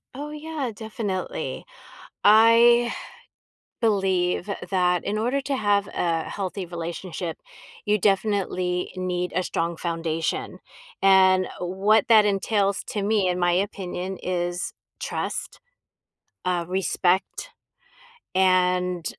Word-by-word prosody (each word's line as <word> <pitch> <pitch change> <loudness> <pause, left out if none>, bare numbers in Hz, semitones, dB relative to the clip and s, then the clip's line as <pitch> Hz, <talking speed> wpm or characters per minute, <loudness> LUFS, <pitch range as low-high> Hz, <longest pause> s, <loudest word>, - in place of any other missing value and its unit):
Oh, 295 +2 -6
yeah, 300 -4 -4
definitely. 205 -3 -4 0.6
I 230 +2 +6 0.9
believe, 190 -4 +1 0.2
that 180 -1 +2
in 210 - -1
order 245 +6 0
to 275 0 -2
have 205 -3 +1
a 165 -2 0
healthy 195 -1 -4
relationship, 170 0 -5 0.5
you 210 0 +3
definitely 190 -3 0
need 180 -1 -2
a 185 - +1
strong 170 -1 -2
foundation, 165 -1 -3 0.4
and 190 -1 +5
what 195 +6 +2
that 215 -2 +7
entails 200 0 +1
to 210 - -4
me, 200 -2 +2
in 180 0 -1
my 175 0 +2
opinion, 190 -1 -3
is 175 -1 -2 0.3
trust, - - -4 0.8
uh, 180 -2 0
respect, 190 - 0 0.9
and 180 -2 +2
190 Hz, 105 wpm, -24 LUFS, 180-210 Hz, 0.9 s, that